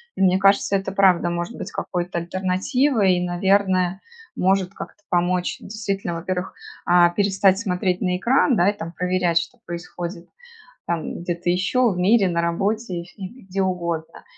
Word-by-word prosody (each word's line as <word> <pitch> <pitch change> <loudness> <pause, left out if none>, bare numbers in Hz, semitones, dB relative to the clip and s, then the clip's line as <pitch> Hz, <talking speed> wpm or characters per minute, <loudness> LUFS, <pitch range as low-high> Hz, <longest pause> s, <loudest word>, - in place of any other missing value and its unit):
и - - -4
мне 185 0 +4
кажется, 195 0 +3
это 195 0 -2
правда 190 -3 +3
может 175 0 -4
быть 200 - -6
какой-то 180 -1 -3
альтернативой. 190 - +1
И, 180 - -1
наверное, 190 0 +1 0.3
может 190 0 +1
как-то 205 - -10
помочь 180 0 0
действительно, 195 -4 -4
во-первых, 180 +2 -4 0.3
а, 175 -1 +5
перестать 195 +1 +2
смотреть 180 -3 -1
на 180 -1 0
экран, 255 +5 +3
да, 185 0 +4
и - - 0
там 165 -1 -6
проверять, 180 -2 0
что 170 +9 -7
происходит 175 0 -7 0.6
там 170 -1 -3
где-то 175 0 -3
еще 190 +8 +2
в 185 - -3
мире, 195 +2 +4
на 170 -1 0
работе 195 +3 -1
и - - -11
фи 185 +3 -15
и 245 +5 -14
где 195 +1 -1
угодно. 170 -3 -3
185 Hz, 165 wpm, -22 LUFS, 175-195 Hz, 0.6 s, а